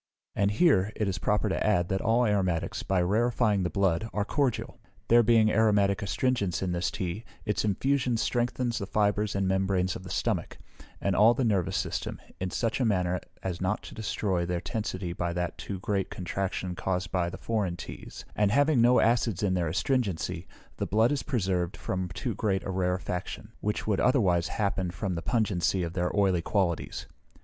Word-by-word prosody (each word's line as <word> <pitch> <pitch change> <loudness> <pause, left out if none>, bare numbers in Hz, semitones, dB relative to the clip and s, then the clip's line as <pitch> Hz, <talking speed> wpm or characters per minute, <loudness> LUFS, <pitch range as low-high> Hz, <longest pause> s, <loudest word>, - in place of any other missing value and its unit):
And 100 - +2
here, 105 - +3
it 105 - -1
is 95 -1 -2
proper 105 +1 +1
to 95 - -1
add, 95 -5 +2
that 95 0 0
all 115 +3 +3
aromatics, 95 -6 0
by 95 -2 +1
rarefying 110 +1 +2
the 90 - 0
blood, 100 +2 +1
are 105 -1 0
cordial. 135 0 -1 0.3
There 120 +1 +7
being 110 -1 +4
aromatic 100 -3 +3
astringents 100 -4 0
in 90 - -1
this 90 +1 0
tea, 95 +2 -4 0.2
its 105 -2 0
infusion 125 +4 +1
strengthens 120 +1 0
the 100 - -4
fibres 105 0 +1
and 100 -1 +1
membranes 95 -1 +1
of - - -6
the 95 - -10
stomach, - - -2 0.4
and 100 -2 0
all 115 +3 +6
the 130 - 0
nervous 100 -6 +1
system, - - -3 0.2
in 95 - -2
such 115 +6 -1
a - - +2
manner 90 -5 +1 0.2
as 95 -2 -3
not 95 - -1
to - - -10
destroy 100 -4 -1
their 85 0 -1
tensity 95 -4 -3
by 85 0 -2
that 90 0 -3
too 100 -2 -5
great 100 0 -1
contraction 95 0 -3
caused 90 0 -2
by 90 -2 0
the - - -7
foreign 105 -6 -1
teas; 85 - -9
and, 105 -1 +3
having 145 0 +4
no 120 +2 +5
acid 115 -4 +2
in 95 -2 +2
their 90 -2 0
astringency, 100 - -1 0.3
the - - -2
blood 110 +5 +3
is 145 - 0
preserved 95 - -1
from 95 -1 -3
too 115 +8 -3
great 95 -2 -1
a - - -3
rarefaction, 90 +2 -3
which 105 0 -2
would 105 -3 +1
otherwise 95 -10 +3
happen 100 -3 -1
from 95 +2 -3
the 85 - -3
pungency 95 -2 +1
of 85 0 -4
their 90 0 0
oily 95 -4 +3
qualities. 90 -3 -1
100 Hz, 185 wpm, -28 LUFS, 90-110 Hz, 0.4 s, There